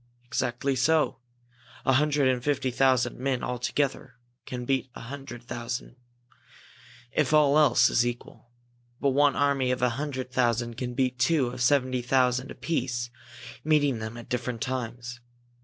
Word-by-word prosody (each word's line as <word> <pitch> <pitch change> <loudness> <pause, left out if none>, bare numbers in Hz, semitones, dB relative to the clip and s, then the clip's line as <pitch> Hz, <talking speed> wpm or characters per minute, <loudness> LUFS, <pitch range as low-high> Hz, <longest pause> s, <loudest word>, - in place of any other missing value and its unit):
"Exactly 130 +1 -1
so! 155 +4 +2 0.7
A 135 - +4
hundred 145 0 +3
and 125 -2 +1
fifty 135 -3 0
thousand 130 -1 +2
men 130 -1 -1
all 125 -1 -3
together 135 +1 -2 0.3
can 125 -1 -5
beat 130 0 0
a - - -8
hundred 130 -1 -8
thousand, 120 0 -5 1.2
if 150 -1 +1
all 145 -2 +5
else 145 -6 +5
is 115 - +3
equal. 120 -1 -6 0.5
But 140 - +2
one 140 +1 +3
army 140 -2 +2
of 125 0 -1
a 125 - +4
hundred 130 -4 -4
thousand 120 -2 0
can 125 0 -4
beat 125 -1 0
two 130 -1 +2
of 125 +1 -7
seventy 130 -1 +2
five 120 - -15
thousand 130 0 +2
apiece, 120 -6 -2 0.5
meeting 145 -5 +2
them 110 +1 -6
at 120 - -10
different 125 -2 -3
times. 125 -1 -4
130 Hz, 155 wpm, -27 LUFS, 120-140 Hz, 1.2 s, all